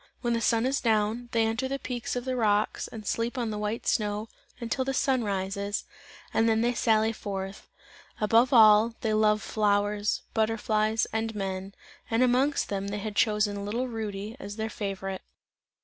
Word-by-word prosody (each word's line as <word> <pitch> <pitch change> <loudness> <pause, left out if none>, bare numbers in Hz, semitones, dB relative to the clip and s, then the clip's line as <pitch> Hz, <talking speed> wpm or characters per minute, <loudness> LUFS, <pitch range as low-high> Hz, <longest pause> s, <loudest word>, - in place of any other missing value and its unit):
When 240 -1 0
the 230 - 0
sun 230 0 +2
is 270 +2 0
down, 225 +1 +1
they 225 -1 +2
enter 225 +4 -1
the 275 +1 -2
peaks 250 -3 -4
of 245 0 -3
the 260 -1 -1
rocks 210 -3 +1
and 215 -2 -9
sleep 230 +4 -1
on 235 -3 -1
the 210 - -4
white 210 +2 -3
snow, 210 0 0 0.3
until 235 +3 -1
the 270 0 -2
sun 260 -3 +2
rises, 200 0 -2 0.5
and 225 0 +3
then 220 0 +2
they 240 +1 +2
sally 220 -1 +2
forth. 195 -2 -6 0.5
Above 230 +5 +4
all, 220 -1 +6
they 220 -1 0
love 215 0 +3
flowers, 205 0 +1
butterflies, 220 0 +1
and 225 0 -2
men, 195 -1 -4 0.3
and 230 +2 +3
amongst 260 +4 +2
them 200 -1 -2
they 205 +1 -3
had 210 0 -5
chosen 210 -2 +1
little 235 +5 -2
Rudy 215 -2 -5
as 205 -6 -7
their 220 0 -3
favourite. 195 -2 -4
220 Hz, 175 wpm, -28 LUFS, 205-235 Hz, 0.5 s, all